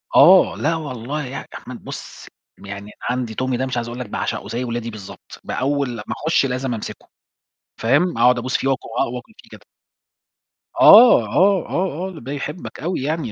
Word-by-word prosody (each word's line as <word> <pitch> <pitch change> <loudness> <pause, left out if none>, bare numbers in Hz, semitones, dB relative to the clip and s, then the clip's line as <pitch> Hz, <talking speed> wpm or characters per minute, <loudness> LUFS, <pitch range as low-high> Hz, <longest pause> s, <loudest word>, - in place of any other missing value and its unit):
آه، 185 +1 +7
لا 165 +2 0
والله 145 -1 -5
يا 125 - -7
يا 135 - -6
أحمد - - -10
بُص، - - -9 0.4
يعني 100 0 -6
أنا 105 - -12 0.2
عَندي 125 -3 -2
Tommy 130 -1 0
ده 130 - -1
مش 130 -1 -3
عايز 120 0 -2
أقول 120 +1 -7
لك 125 -5 -6
باعشقه - - -3
زي 120 +2 -3
ولادي 120 -1 -4
بالضبط. 105 -3 -11
بأول 140 0 -1
لمّا 110 -3 -7 0.2
أخش 160 -3 +3
لازم 130 -1 -2
أمسكه. 110 - -7 0.7
فاهم، 145 +5 +1
أقعد 125 +1 +4
أبوس 130 +3 -1
فيه 135 - -2
وآك 135 -2 -1
وآكل 125 - -4
فيه - - -18
كده. - - -12 1.2
آه، 235 +3 +9
آه، 195 -1 +4
آه، 185 0 -2
آه، 170 - -10
ده 130 +4 -8
يحبك 150 +4 -6
أوي 175 -2 -2
يعني، 150 -4 -2
130 Hz, 185 wpm, -20 LUFS, 120-155 Hz, 1.2 s, آه